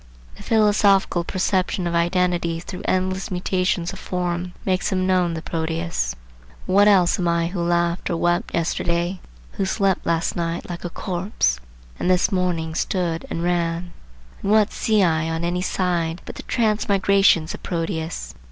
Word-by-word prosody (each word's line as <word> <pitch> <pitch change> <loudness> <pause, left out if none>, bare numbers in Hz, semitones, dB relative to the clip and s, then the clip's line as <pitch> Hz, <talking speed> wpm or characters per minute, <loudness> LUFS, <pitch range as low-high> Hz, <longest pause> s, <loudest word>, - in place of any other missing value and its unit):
The - - -13
philosophical 205 -5 +3
perception 185 +1 0
of 170 - -1
identity 170 -1 +1
through 180 +2 -7
endless 185 +1 0
mutations 180 -1 -1
of 190 - -9
form 180 0 -3
makes 185 -1 0
him 185 -1 +1
know 185 -2 +2
the 165 -1 -5
Proteus. 165 - -2 0.5
What 200 +2 +4
else 190 -4 +4
am 175 - 0
I 170 0 +1
who 180 -1 -3
laughed 170 0 0
or 170 - 0
wept 175 +1 0
yesterday, 170 +2 -1 0.3
who 195 - -2
slept 195 -1 +1
last 165 0 0
night 170 0 -3
like 175 -1 -6
a 175 - -3
corpse, 175 - -1 0.4
and - - 0
this 180 -1 +3
morning 175 -4 0
stood 170 -1 -1
and 165 - -3
ran? 175 0 -1 0.5
And 200 - -2
what 215 -1 +4
see 215 -3 +2
I 165 -2 +1
on 165 +1 -2
any 175 +1 -1
side 175 -3 -1
but - - -7
the - - -9
transmigrations 200 -6 +3
of - - -9
Proteus? 165 - -3
175 Hz, 160 wpm, -22 LUFS, 170-185 Hz, 0.5 s, What